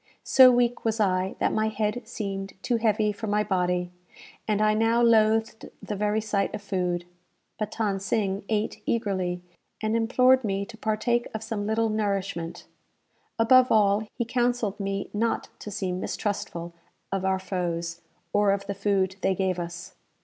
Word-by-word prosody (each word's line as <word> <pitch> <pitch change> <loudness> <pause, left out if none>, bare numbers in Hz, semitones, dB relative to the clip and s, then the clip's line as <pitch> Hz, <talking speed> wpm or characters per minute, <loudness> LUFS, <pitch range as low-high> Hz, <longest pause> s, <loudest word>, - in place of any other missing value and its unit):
So 260 -1 +8
weak 245 0 +1
was 225 0 0
I, 190 -2 +1
that - - +1
my 215 0 +1
head 220 +2 -1
seemed 195 -4 -4
too 240 - +1
heavy 215 -1 +2
for 220 +2 -6
my 210 0 +2
body, 180 -3 0 0.6
and 210 -2 +1
I 215 0 +3
now 225 +2 +2
loathed 225 -1 +3
the 210 - -5
very 210 +1 +1
sight 210 -1 -1
of 205 - -8
food. 180 -3 -1 0.5
But 215 -1 -3
Than 205 -4 0
Sing 195 0 -1
ate 215 0 -1
eagerly, 185 -5 -1 0.4
and 215 +1 0
implored 255 +3 +4
me 200 -2 -1
to 230 - -11
partake 225 +2 0
of 220 - -4
some 205 -2 -3
little 225 +1 +1
nourishment. 195 -5 -2 0.7
Above 250 +3 +5
all, 210 0 +3
he 240 - -1
counselled 240 -4 0
me 195 0 -3
not 225 +2 -1
to - - -7
seem 185 -2 -3
mistrustful 175 -4 -3 0.4
of 195 -1 -1
our 190 0 +2
foes, 170 -3 -3 0.3
or 205 0 +3
of 200 0 -3
the 200 - -3
food 195 -1 0
they 190 0 +2
gave 185 -1 0
us. 170 0 -6
210 Hz, 165 wpm, -26 LUFS, 190-225 Hz, 0.7 s, So